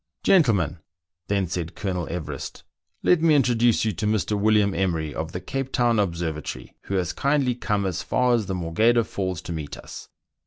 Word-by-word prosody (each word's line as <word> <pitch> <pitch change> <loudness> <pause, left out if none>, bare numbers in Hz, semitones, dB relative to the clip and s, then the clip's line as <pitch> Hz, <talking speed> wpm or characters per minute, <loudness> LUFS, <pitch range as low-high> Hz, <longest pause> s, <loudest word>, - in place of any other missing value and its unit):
" - - -54
Gentlemen," 105 - +3 0.5
then 100 -1 +1
said 85 0 -4
Colonel 90 -4 -3
Everest, 75 -5 -6 0.2
" - - -48
let 175 -3 +4
me 160 -2 +5
intro 125 -4 +3
duce 115 -1 +3
you 110 - +1
to 105 +2 -3
Mr. 110 0 0
William 105 -1 +3
Emery, 80 -6 -1
of 80 +1 -4
the 90 - -4
Cape 135 +8 -4
Town 120 -2 +2
Obser 85 -4 0
vatory, 75 0 -7
who 100 - -3
has 90 -1 0
kindly 140 -1 +1
come 105 -4 -1
as 95 -3 -2
far 125 -1 +2
as 110 -5 +1
the 95 - -2
Morgheda 110 +8 +2
Falls 95 -4 -4
to 85 - -5
meet 75 -3 -5
us." - - -10
100 Hz, 200 wpm, -24 LUFS, 85-120 Hz, 0.5 s, me